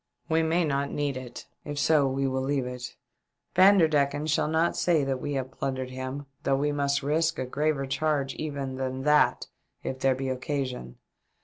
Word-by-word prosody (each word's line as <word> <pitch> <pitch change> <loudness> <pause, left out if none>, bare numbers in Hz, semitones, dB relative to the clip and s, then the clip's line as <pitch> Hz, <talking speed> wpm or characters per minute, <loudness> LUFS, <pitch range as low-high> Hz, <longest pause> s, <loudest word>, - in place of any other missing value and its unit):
" - - -42
We 160 0 +3
may 165 +2 +2
not 140 -1 0
need 145 -2 -2
it; 130 -2 -8 0.2
if 145 -1 -6
so 145 -1 +4
we 135 +1 -1
will 130 0 -1
leave 135 -1 0
it. 125 0 -6 0.6
Vanderdecken 155 -7 +4
shall 155 -1 +1
not 160 +2 +1
say 165 -5 +2
that 135 -1 -2
we 145 - -3
have 130 -1 -3
plundered 130 -1 -3
him 130 +2 -5 0.2
though 135 - +1
we 145 +2 +1
must 140 -1 0
risk 160 +3 +1
a 130 - -2
graver 145 +1 0
charge 140 0 0
even 140 -4 -4
than 130 0 -3
that 150 +1 +3 0.4
if 130 - -4
there 135 -1 +3
be 135 0 -3
occasion. 130 - -3
140 Hz, 185 wpm, -27 LUFS, 130-150 Hz, 0.6 s, so